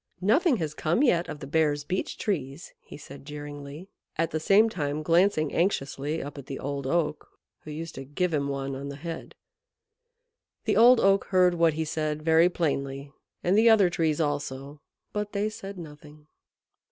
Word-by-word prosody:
"Nothing 260 Hz, -, +3 dB
has 155 Hz, -5 st, -3 dB
come 165 Hz, -, +1 dB
yet 175 Hz, -11 st, +2 dB
of 150 Hz, -, -7 dB
the -, -, -6 dB
Bear's 145 Hz, 0 st, +1 dB
Beech 185 Hz, +6 st, -3 dB
Trees," 150 Hz, -7 st, -3 dB
he -, -, -12 dB
said 140 Hz, -1 st, -12 dB
jeeringly, 145 Hz, +2 st, -8 dB, 0.3 s
at 165 Hz, +1 st, 0 dB
the 155 Hz, -, -1 dB
same 200 Hz, +7 st, +5 dB
time 150 Hz, -7 st, -3 dB
glancing 165 Hz, -2 st, +2 dB
anxiously 155 Hz, -3 st, -1 dB
up 145 Hz, +1 st, -8 dB
at 135 Hz, -, -11 dB
the 135 Hz, -, -5 dB
Old 140 Hz, -1 st, -4 dB
Oak, 155 Hz, 0 st, -1 dB, 0.3 s
who -, -, -12 dB
used 160 Hz, +2 st, -6 dB
to 135 Hz, -, -7 dB
give 160 Hz, +6 st, -2 dB
him 140 Hz, -2 st, 0 dB
one 135 Hz, -1 st, -3 dB
on 140 Hz, +1 st, -6 dB
the 140 Hz, -, -6 dB
head. 165 Hz, +3 st, -7 dB, 1.3 s
The -, -, +1 dB
Old 245 Hz, +2 st, +7 dB
Oak 195 Hz, 0 st, +3 dB
heard 180 Hz, -2 st, +3 dB
what 165 Hz, -2 st, +3 dB
he 160 Hz, +1 st, -2 dB
said 155 Hz, -1 st, -2 dB
very 165 Hz, +2 st, +5 dB
plainly, 140 Hz, -5 st, -2 dB, 0.3 s
and 180 Hz, +3 st, +2 dB
the 225 Hz, +2 st, +6 dB
other 205 Hz, -5 st, +5 dB
Trees 160 Hz, -3 st, 0 dB
also; 145 Hz, -1 st, -3 dB, 0.3 s
but 210 Hz, 0 st, -3 dB
they 205 Hz, +1 st, 0 dB
said 195 Hz, -2 st, -8 dB
nothing. 150 Hz, -2 st, -12 dB
155 Hz, 175 wpm, -27 LUFS, 145-180 Hz, 1.3 s, Old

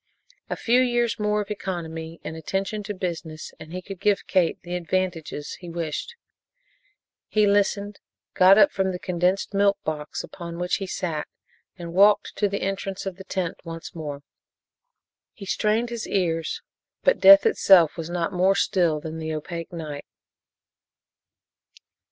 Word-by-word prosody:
A -, -, -1 dB
few 245 Hz, +2 st, +3 dB
years 240 Hz, -2 st, +1 dB
more 210 Hz, 0 st, +1 dB
of 205 Hz, 0 st, -7 dB
economy 165 Hz, -4 st, -5 dB
and 160 Hz, -, -6 dB
attention 195 Hz, +6 st, -3 dB
to 210 Hz, -, -3 dB
business 165 Hz, -4 st, -5 dB
and 160 Hz, -, -11 dB
he 185 Hz, +1 st, -5 dB
could 195 Hz, -1 st, -8 dB
give 205 Hz, 0 st, +1 dB
Kate 180 Hz, -4 st, +1 dB
the 175 Hz, 0 st, -6 dB
advantages 175 Hz, -4 st, -3 dB
he 175 Hz, -, -9 dB
wished. 170 Hz, -, -4 dB, 1.1 s
He 215 Hz, -1 st, +3 dB
listened, 205 Hz, 0 st, +1 dB, 0.3 s
got 190 Hz, +2 st, +7 dB
up 205 Hz, -2 st, +6 dB
from 190 Hz, -1 st, 0 dB
the -, -, -3 dB
condensed 180 Hz, +2 st, 0 dB
milk 200 Hz, 0 st, +3 dB
box 150 Hz, -3 st, -4 dB
upon 170 Hz, -1 st, -8 dB
which 180 Hz, +1 st, 0 dB
he 195 Hz, -, -5 dB
sat 165 Hz, -4 st, -3 dB, 0.5 s
and 170 Hz, -2 st, -7 dB
walked 205 Hz, +2 st, +4 dB
to 205 Hz, -, +2 dB
the 200 Hz, -, -3 dB
entrance 195 Hz, 0 st, -3 dB
of 190 Hz, -2 st, -4 dB
the 190 Hz, -, -9 dB
tent 185 Hz, -2 st, -3 dB
once 165 Hz, -1 st, -8 dB
more. 145 Hz, -3 st, -6 dB, 1.1 s
He 200 Hz, -, -10 dB
strained 220 Hz, +4 st, 0 dB
his 235 Hz, -2 st, -4 dB
ears, 165 Hz, -4 st, -1 dB, 0.4 s
but -, -, +3 dB
death 295 Hz, +5 st, +9 dB
itself 190 Hz, -, +5 dB
was 165 Hz, -1 st, -5 dB
not 175 Hz, -1 st, -2 dB
more 185 Hz, +2 st, +3 dB
still 175 Hz, -6 st, +2 dB
than 160 Hz, +1 st, -6 dB
the 160 Hz, 0 st, -4 dB
opaque 165 Hz, +2 st, -6 dB
night. 155 Hz, -4 st, -6 dB
185 Hz, 155 wpm, -24 LUFS, 165-200 Hz, 1.1 s, death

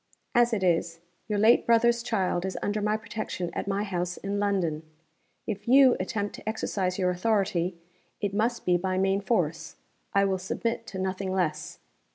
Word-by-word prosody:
As 240 Hz, 0 st, +4 dB
it 210 Hz, -4 st, -1 dB
is, 170 Hz, -1 st, +1 dB, 0.3 s
your 210 Hz, -1 st, -1 dB
late 220 Hz, +4 st, +4 dB
brother's 235 Hz, 0 st, +4 dB
child 190 Hz, -7 st, 0 dB
is 190 Hz, 0 st, -3 dB
under 210 Hz, +1 st, -1 dB
my 210 Hz, +1 st, +1 dB
protection 215 Hz, -5 st, -5 dB
at -, -, -4 dB
my 200 Hz, +1 st, 0 dB
house 180 Hz, -3 st, -3 dB
in 200 Hz, +1 st, -3 dB
London. 185 Hz, -7 st, 0 dB, 0.6 s
If 210 Hz, -1 st, -5 dB
you 260 Hz, 0 st, +7 dB
attempt 205 Hz, +2 st, -2 dB
to -, -, -6 dB
exercise 190 Hz, -4 st, -2 dB
your 180 Hz, -2 st, +1 dB
authority, 185 Hz, -2 st, 0 dB, 0.4 s
it 200 Hz, -2 st, -2 dB
must 230 Hz, +3 st, 0 dB
be 180 Hz, -1 st, +4 dB
by 185 Hz, +1 st, -1 dB
main 195 Hz, +1 st, +2 dB
force 170 Hz, -7 st, -1 dB, 0.4 s
I 200 Hz, 0 st, +5 dB
will 190 Hz, -1 st, 0 dB
submit 230 Hz, +5 st, -3 dB
to 190 Hz, -, -7 dB
nothing 190 Hz, 0 st, -2 dB
less. 165 Hz, -5 st, -2 dB
195 Hz, 175 wpm, -27 LUFS, 180-220 Hz, 0.6 s, you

